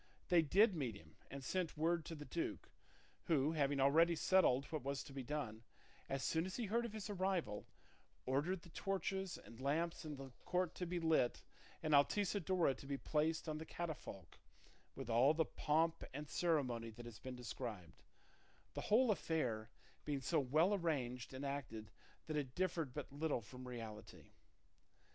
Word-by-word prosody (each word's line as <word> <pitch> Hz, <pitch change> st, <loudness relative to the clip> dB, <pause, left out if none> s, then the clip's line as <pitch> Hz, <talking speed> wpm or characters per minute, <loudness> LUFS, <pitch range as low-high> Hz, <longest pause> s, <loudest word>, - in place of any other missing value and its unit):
They 175 Hz, -2 st, +7 dB
did 195 Hz, +8 st, +5 dB
meet 130 Hz, -, -2 dB
him, 80 Hz, -3 st, -14 dB
and 140 Hz, 0 st, -6 dB
sent 175 Hz, +3 st, -1 dB
word 165 Hz, +1 st, +2 dB
to 165 Hz, -, -5 dB
the 150 Hz, -1 st, -7 dB
duke, 335 Hz, -, -3 dB, 0.5 s
who, 155 Hz, -3 st, +3 dB
having 140 Hz, -3 st, +1 dB
already 165 Hz, +5 st, +5 dB
settled 155 Hz, -7 st, +4 dB
what 155 Hz, -, -1 dB
was 140 Hz, +1 st, -2 dB
to 140 Hz, -, -11 dB
be 135 Hz, -, -3 dB
done, 125 Hz, -5 st, -3 dB, 0.5 s
as 135 Hz, 0 st, -1 dB
soon 165 Hz, +2 st, +1 dB
as 190 Hz, -, -5 dB
he 240 Hz, -, -1 dB
heard 230 Hz, +4 st, +1 dB
of 220 Hz, -, -10 dB
his 215 Hz, -2 st, -4 dB
arrival, 185 Hz, -, -1 dB, 0.6 s
ordered 155 Hz, +8 st, 0 dB
the 170 Hz, -, -13 dB
torches 195 Hz, 0 st, -2 dB
and 115 Hz, +2 st, -12 dB
lamps 165 Hz, +6 st, 0 dB
in 155 Hz, -2 st, -5 dB
the 135 Hz, -1 st, -8 dB
court 180 Hz, -1 st, 0 dB
to 180 Hz, -, -3 dB
be 175 Hz, +1 st, -1 dB
lit 160 Hz, -7 st, +2 dB, 0.4 s
and 155 Hz, -, +1 dB
Altisidora 180 Hz, +1 st, +3 dB
to 140 Hz, -, -10 dB
be 140 Hz, 0 st, -1 dB
placed 155 Hz, +3 st, 0 dB
on 155 Hz, -1 st, -2 dB
the -, -, -4 dB
catafalque 155 Hz, -, -6 dB, 0.6 s
with 135 Hz, -3 st, -6 dB
all 125 Hz, +6 st, +5 dB
the 160 Hz, 0 st, +3 dB
pomp 160 Hz, +2 st, +1 dB
and 150 Hz, +1 st, -4 dB
ceremony 130 Hz, -11 st, +1 dB
that 120 Hz, +2 st, -10 dB
has 120 Hz, -2 st, -9 dB
been 130 Hz, -1 st, -6 dB
described, 110 Hz, -6 st, -6 dB, 0.7 s
the -, -, -3 dB
whole 235 Hz, +2 st, +5 dB
affair 125 Hz, -, 0 dB, 0.3 s
being 145 Hz, -2 st, -1 dB
so 165 Hz, -, +3 dB
well 155 Hz, +8 st, +3 dB
arranged 135 Hz, -10 st, -1 dB
and 135 Hz, +1 st, -5 dB
acted 120 Hz, -6 st, -4 dB, 0.3 s
that 155 Hz, -, -3 dB
it 135 Hz, -4 st, -2 dB
differed 175 Hz, -6 st, 0 dB
but 140 Hz, +1 st, -6 dB
little 145 Hz, -3 st, 0 dB
from 125 Hz, +4 st, -9 dB
reality. 115 Hz, -4 st, -8 dB
150 Hz, 170 wpm, -40 LUFS, 130-170 Hz, 0.7 s, They